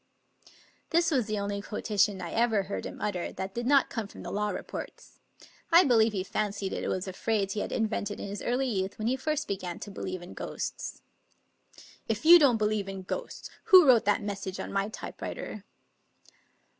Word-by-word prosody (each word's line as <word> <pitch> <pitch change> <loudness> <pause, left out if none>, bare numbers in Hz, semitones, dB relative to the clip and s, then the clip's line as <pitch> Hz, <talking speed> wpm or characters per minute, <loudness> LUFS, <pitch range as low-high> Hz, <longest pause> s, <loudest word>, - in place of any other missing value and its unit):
" - - -22 0.3
This 340 0 +3
was 255 -7 +1
the 215 -1 -1
only 200 0 -2
quo 210 +1 -6
tation 200 -2 +1
I 170 - -5
ever 225 -3 +2
heard 195 +1 -4
him - - -9
utter 185 -4 -2
that 190 +1 -5
did 240 +2 -3
not 280 0 +4
come 225 -3 -3
from - - -11
the - - -6
Law 210 +1 0
Reports. - - -7 0.5
I 340 +2 +8
believe 230 -6 +4
he 190 -3 -2
fancied 200 -1 -2
it - - -3
was 185 +1 -2
a 190 - -5
phrase 200 -1 0
he 215 - -2
had - - -3
invented 215 -2 -1
in - - -5
his 200 0 -5
early 250 +3 0
youth 190 -5 -2
when 215 - -4
he 255 - +2
first 305 +3 -2
began 185 -3 -4
to 205 - -7
believe 185 -2 -5
in 175 - -10
ghosts. - - -5 0.5
" - - -22
If 225 +5 -2
you 345 +2 +10
don't 270 -7 +5
believe 210 -2 0
in 195 -1 -6
ghosts, - - -6
who 375 -6 +9
wrote 245 -6 +6
that 205 +1 +2
mes 205 -1 -3
sage 190 -1 -6
on - - -5
my 195 +1 0
typewriter?" 215 -1 -7
210 Hz, 205 wpm, -29 LUFS, 195-240 Hz, 0.5 s, you